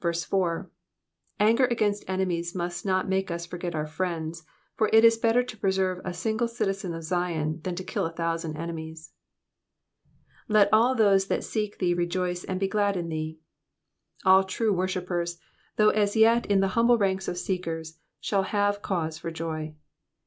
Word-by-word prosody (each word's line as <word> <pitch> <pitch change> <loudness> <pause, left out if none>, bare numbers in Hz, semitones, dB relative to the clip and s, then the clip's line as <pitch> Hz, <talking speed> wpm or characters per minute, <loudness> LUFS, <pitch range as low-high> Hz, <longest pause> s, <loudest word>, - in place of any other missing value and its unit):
Anger 225 +5 +4
against 215 -4 0
enemies 180 -2 -1
must 175 -1 -3
not 185 -1 +1
make 190 0 0
us 170 0 -4
forget 175 0 -5
our 155 -1 -1
friends, 165 0 -3 0.3
for 215 -1 +1
it 225 +1 +7
id 230 0 +5
better 235 +2 +3
to 250 -2 -8
preserve 190 -3 0
a 185 - -3
single 220 +6 -1
citizen 195 -6 -2
of 165 - -7
Ziou, 165 -2 -1
than 180 +1 -3
to 185 - -5
kill 190 -1 -2
a - - -7
thousand 165 -1 -3
enemies. 160 -1 -7 1.4
^''Let 210 -1 +5
all 240 +4 +5
those 200 -4 +4
tliat - - -1
seek 210 -2 -3
thee 175 -2 +1
rejoice 175 +1 -1
and 185 -1 -3
he 195 - +1
glad 205 -1 +1
in 170 -1 -3
thee.'*'* 155 0 -4 0.9
All 190 0 +7
true 205 +3 0
worshippers, 180 -2 -2 0.4
though 215 0 +5
as 205 -1 +1
yet 230 +2 +4
in 200 -1 +3
the 195 - +2
humble 235 +4 +4
ranks 190 -2 0
of 175 - -3
seekers, 165 -4 -4 0.2
shall 200 -2 0
have 205 +1 0
cause 160 -5 -2
for 165 - -4
joy. 155 -1 -5
185 Hz, 165 wpm, -27 LUFS, 170-205 Hz, 1.4 s, it